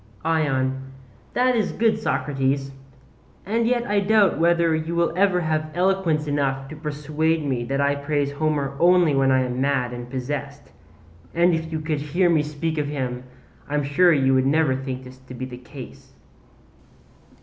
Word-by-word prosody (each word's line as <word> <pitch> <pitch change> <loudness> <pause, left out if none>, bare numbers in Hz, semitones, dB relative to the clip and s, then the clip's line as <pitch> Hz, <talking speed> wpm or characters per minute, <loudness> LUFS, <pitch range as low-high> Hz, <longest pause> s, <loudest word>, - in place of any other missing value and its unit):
ION: 135 -5 0 0.5
That 250 0 +3
is 220 - 0
good, 220 -2 +1
Socrates; 135 -7 -1 0.7
and 225 +4 0
yet 240 -1 +1
I 205 -2 +1
doubt 200 -4 +3
whether 170 0 +3
you 160 +2 -3
will 170 -1 +1
ever 185 -1 +2
have 155 -1 -1
eloquence 180 -4 +1
enough 135 -2 -1
to 155 - -8
persuade 150 +1 -1
me 130 -4 -1
that 135 +2 -2
I 140 0 +2
praise 140 0 -1
Homer 145 -2 -1
only 175 -3 +4
when 135 -1 +3
I 130 0 +3
am 125 0 -3
mad 135 -3 0
and 120 0 -7
possessed; 140 +2 -5 0.6
and 175 +1 +4
if 160 0 -2
you 160 - -2
could 155 -2 -2
hear 170 +5 +1
me 160 -3 +3
speak 150 +1 -3
of 145 - -1
him 130 -3 -4 0.4
I 145 - -2
am 145 - +1
sure 150 +6 +4
you 135 -4 +3
would 130 0 +3
never 150 -2 +2
think 130 -1 -5
this 130 0 -13
to 130 -1 -12
be 130 +1 -5
the 125 -1 -9
case. 130 +1 -12
150 Hz, 175 wpm, -23 LUFS, 135-170 Hz, 0.7 s, only